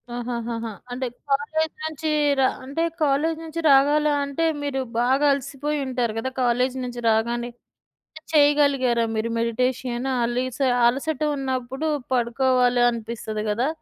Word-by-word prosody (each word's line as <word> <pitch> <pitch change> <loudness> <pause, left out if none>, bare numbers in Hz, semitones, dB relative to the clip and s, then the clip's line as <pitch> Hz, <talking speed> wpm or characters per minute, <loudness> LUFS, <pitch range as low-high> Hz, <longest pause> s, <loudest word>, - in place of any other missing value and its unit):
ఆహాహహా! 235 -1 -4 0.2
అంటే 255 +1 -3 0.2
కాలేజీ 310 +3 0
నుంచి 315 0 -3 0.3
రా 265 - +5 0.2
అంటే 280 +5 -2 0.2
కాలేజీ 305 +2 +2
నుంచి 325 +1 -5
రావాలా, 290 +2 +4
అంటే 280 +4 -1 0.2
మీరు 285 -2 -2 0.2
బాగా 260 +4 +2
అలసిపోయి 280 +2 -3
ఉంటారు 245 -3 -1
కదా! 225 +3 -2
కాలేజీ 250 +1 +1
నుంచి 245 -1 -6
రాగానే, 235 +2 0 0.7
కాని 315 0 -14
చేయగలిగారా 285 -5 +4
మీరు 220 +1 -1
మెడిటేషన్? 245 +2 -1 0.2
అలీస 250 +1 -2 0.3
అలసట 275 +4 -2 0.2
ఉన్నప్పుడు 265 +2 -3 0.3
పడుకోవాలి 245 0 +2
అనిపిస్తది 220 -2 -5
గాదా. 235 +6 +1
255 Hz, 120 wpm, -23 LUFS, 240-285 Hz, 0.7 s, రా